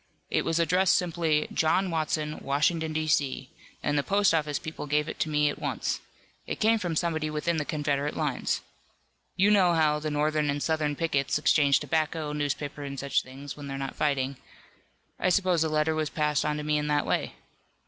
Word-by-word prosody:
"It -, -, +2 dB
was 165 Hz, 0 st, +1 dB
addressed 180 Hz, +2 st, +3 dB
simply 165 Hz, -3 st, +1 dB
'John 180 Hz, +4 st, +2 dB
Watson, 155 Hz, -1 st, -1 dB
Washington, 155 Hz, +3 st, 0 dB
D. 155 Hz, 0 st, -1 dB
C.,' 140 Hz, -2 st, 0 dB, 0.3 s
and 145 Hz, 0 st, +1 dB
the -, -, +2 dB
post 200 Hz, +3 st, +2 dB
office 150 Hz, -3 st, 0 dB
people 155 Hz, -2 st, -6 dB
gave 150 Hz, +1 st, +1 dB
it -, -, -6 dB
to 155 Hz, -, 0 dB
me 150 Hz, -1 st, +2 dB
at 145 Hz, -, -2 dB
once. -, -, -2 dB, 0.5 s
It -, -, -4 dB
came 225 Hz, 0 st, +3 dB
from 175 Hz, -5 st, -2 dB
somebody 160 Hz, -2 st, 0 dB
within 155 Hz, +2 st, -1 dB
the 150 Hz, -, -1 dB
Confederate 145 Hz, -1 st, -1 dB
lines. 150 Hz, -5 st, -1 dB, 0.7 s
You 200 Hz, +3 st, +4 dB
know 185 Hz, -4 st, +4 dB
how 150 Hz, -2 st, +3 dB
the 155 Hz, 0 st, -3 dB
Northern 150 Hz, 0 st, +1 dB
and 145 Hz, 0 st, -1 dB
Southern 155 Hz, -2 st, 0 dB
pickets 140 Hz, -4 st, 0 dB
exchange 145 Hz, -2 st, +4 dB
tobacco, 155 Hz, -1 st, -1 dB
newspapers 145 Hz, 0 st, -3 dB
and 140 Hz, -1 st, -6 dB
such 140 Hz, 0 st, +1 dB
things, 135 Hz, +2 st, -9 dB
when 145 Hz, -1 st, -8 dB
they're 135 Hz, 0 st, -4 dB
not 135 Hz, 0 st, -4 dB
fighting. 140 Hz, -2 st, 0 dB, 0.8 s
I 185 Hz, -, +2 dB
suppose 180 Hz, -3 st, +2 dB
the 160 Hz, -, +2 dB
letter 155 Hz, +1 st, +1 dB
was 155 Hz, -1 st, -1 dB
passed 150 Hz, -1 st, 0 dB
on 150 Hz, 0 st, 0 dB
to 150 Hz, -, -4 dB
me 150 Hz, 0 st, +1 dB
in 150 Hz, -, -2 dB
that 150 Hz, 0 st, +1 dB
way. -, -, -1 dB
150 Hz, 195 wpm, -27 LUFS, 145-160 Hz, 0.8 s, You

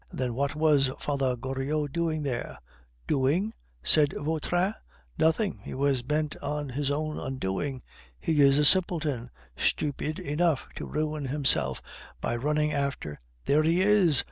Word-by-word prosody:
"Then 125 Hz, -2 st, -2 dB
what 140 Hz, +3 st, -1 dB
was 150 Hz, -3 st, +4 dB
Father 135 Hz, -3 st, 0 dB
Goriot 135 Hz, +4 st, -2 dB
doing 160 Hz, -2 st, 0 dB
there?" 125 Hz, -4 st, -3 dB, 0.5 s
"Doing?" 160 Hz, +11 st, +1 dB, 0.3 s
said 150 Hz, -2 st, +4 dB
Vautrin. 160 Hz, +6 st, 0 dB, 0.5 s
"Nothing; 165 Hz, +6 st, +2 dB
he -, -, -6 dB
was 135 Hz, -1 st, +1 dB
bent 150 Hz, +4 st, -1 dB
on 150 Hz, -1 st, -3 dB
his 140 Hz, +2 st, -2 dB
own 155 Hz, +1 st, -2 dB
undoing. 130 Hz, +2 st, -3 dB, 0.4 s
He 155 Hz, -3 st, +2 dB
is 140 Hz, 0 st, +6 dB
a 150 Hz, -, +4 dB
simpleton, 155 Hz, -8 st, +2 dB, 0.3 s
stupid 150 Hz, +1 st, -1 dB
enough 150 Hz, 0 st, 0 dB
to -, -, -5 dB
ruin 155 Hz, -1 st, -2 dB
himself 135 Hz, 0 st, 0 dB, 0.4 s
by -, -, -1 dB
running 150 Hz, +4 st, 0 dB
after 140 Hz, -, -3 dB
" -, -, -36 dB
"There 150 Hz, +2 st, +4 dB
he 165 Hz, +4 st, +3 dB
is!" 190 Hz, -9 st, +4 dB
145 Hz, 145 wpm, -28 LUFS, 135-155 Hz, 0.5 s, is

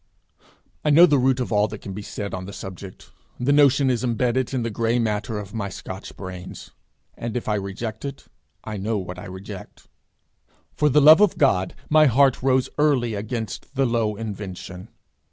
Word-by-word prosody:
I -, -, +1 dB
know 165 Hz, +4 st, +8 dB
the 145 Hz, -5 st, +3 dB
root 130 Hz, 0 st, +2 dB
of 125 Hz, -, -3 dB
all 105 Hz, 0 st, +3 dB
that 105 Hz, 0 st, -9 dB
can 95 Hz, -, -6 dB
be 105 Hz, -, -6 dB
said 100 Hz, 0 st, -6 dB
on 95 Hz, 0 st, -4 dB
the 100 Hz, -, -9 dB
subject; 95 Hz, 0 st, -9 dB, 0.3 s
the 125 Hz, +3 st, +1 dB
notion 140 Hz, -2 st, +4 dB
is 125 Hz, 0 st, -1 dB
imbedded 125 Hz, +1 st, 0 dB
in 130 Hz, -3 st, -1 dB
the 115 Hz, -, -2 dB
gray 115 Hz, +3 st, 0 dB
matter 110 Hz, -1 st, -1 dB
of 105 Hz, 0 st, -7 dB
my 100 Hz, -3 st, -3 dB
Scotch 95 Hz, 0 st, -9 dB
brains; 95 Hz, -1 st, -8 dB, 0.4 s
and 120 Hz, +1 st, -4 dB
if 120 Hz, -, -5 dB
I 110 Hz, -, +1 dB
reject 105 Hz, +2 st, -4 dB
it, 140 Hz, -1 st, -6 dB, 0.4 s
I 110 Hz, -1 st, -5 dB
know 105 Hz, +3 st, -1 dB
what 90 Hz, -1 st, -6 dB
I -, -, -9 dB
reject. 95 Hz, +1 st, -10 dB, 0.9 s
For 150 Hz, -, +2 dB
the 150 Hz, +2 st, +4 dB
love 155 Hz, +6 st, +8 dB
of 210 Hz, -4 st, +3 dB
God 95 Hz, -10 st, +2 dB
my 155 Hz, 0 st, +5 dB
heart 135 Hz, +1 st, +3 dB
rose 130 Hz, 0 st, +2 dB
early 135 Hz, -6 st, +2 dB
against 110 Hz, +4 st, -5 dB
the 135 Hz, 0 st, +2 dB
low 115 Hz, -3 st, 0 dB
invention. 95 Hz, -4 st, -7 dB
115 Hz, 190 wpm, -23 LUFS, 100-130 Hz, 0.9 s, know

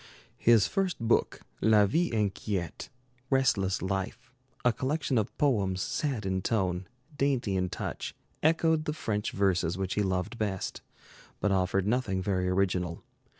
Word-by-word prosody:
His 115 Hz, -3 st, +5 dB
first 190 Hz, -2 st, 0 dB
book, 115 Hz, 0 st, +1 dB, 0.2 s
'La 105 Hz, -2 st, +5 dB
Vie 170 Hz, -, +1 dB
Inquiète' 100 Hz, -4 st, -2 dB, 0.4 s
'Restless 105 Hz, -10 st, +2 dB
Life', 95 Hz, +4 st, -3 dB, 0.3 s
a 125 Hz, -, +5 dB
collection 135 Hz, +1 st, 0 dB
of 105 Hz, -, -3 dB
poems 100 Hz, -11 st, +2 dB
sad 130 Hz, +1 st, -2 dB
in 95 Hz, -1 st, 0 dB
tone, 95 Hz, -4 st, 0 dB, 0.3 s
dainty 135 Hz, -8 st, +1 dB
in 90 Hz, -1 st, 0 dB
touch, -, -, -5 dB, 0.3 s
echoed 160 Hz, 0 st, +3 dB
the 150 Hz, -, -1 dB
French 105 Hz, -8 st, -2 dB
verses 90 Hz, -3 st, +1 dB
which 95 Hz, -1 st, -2 dB
he 105 Hz, -, +1 dB
loved 95 Hz, +4 st, -1 dB
best, 100 Hz, -4 st, -2 dB, 0.6 s
but 105 Hz, -, +1 dB
offered 95 Hz, 0 st, +1 dB
nothing 105 Hz, -4 st, 0 dB
very 95 Hz, -1 st, 0 dB
original. 90 Hz, -2 st, 0 dB
105 Hz, 140 wpm, -29 LUFS, 95-125 Hz, 0.6 s, His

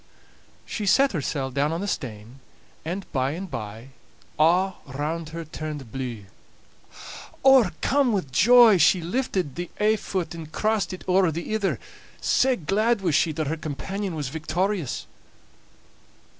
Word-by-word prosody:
She 210 Hz, -2 st, -4 dB
set 270 Hz, +9 st, +4 dB
hersel' 140 Hz, -4 st, -2 dB
down 140 Hz, +3 st, 0 dB
on 165 Hz, -, -2 dB
the 200 Hz, -, -3 dB
stane, 115 Hz, -, -5 dB, 0.4 s
and 180 Hz, +5 st, -4 dB
by 135 Hz, 0 st, 0 dB
and 180 Hz, +1 st, -6 dB
by 110 Hz, +3 st, -6 dB, 0.5 s
a' 180 Hz, +5 st, +4 dB, 0.2 s
round 150 Hz, +4 st, -3 dB
her 165 Hz, 0 st, -6 dB
turned 150 Hz, -5 st, -7 dB
blue. 120 Hz, -5 st, -5 dB, 1.2 s
O'ercome 260 Hz, -, +4 dB
wi' 200 Hz, -3 st, +1 dB
joy, 230 Hz, -, +7 dB
she 185 Hz, -, +5 dB
lifted 180 Hz, -, -2 dB
the 175 Hz, +3 st, -5 dB
ae 215 Hz, +1 st, +3 dB
fit 185 Hz, -5 st, -3 dB
and 160 Hz, -2 st, -9 dB
crossed 215 Hz, 0 st, 0 dB
it 185 Hz, -, -8 dB
owre 185 Hz, -2 st, +3 dB
the 170 Hz, +7 st, -4 dB
ither, 210 Hz, -3 st, 0 dB, 0.4 s
sae 260 Hz, 0 st, +2 dB
glad 215 Hz, +5 st, +1 dB
was 175 Hz, -5 st, 0 dB
she 160 Hz, +2 st, +3 dB
that 155 Hz, 0 st, -2 dB
her 155 Hz, +3 st, -2 dB
companion 180 Hz, +5 st, -4 dB
was 145 Hz, -4 st, -3 dB
victorious. 165 Hz, -, -2 dB
170 Hz, 145 wpm, -25 LUFS, 145-200 Hz, 1.2 s, joy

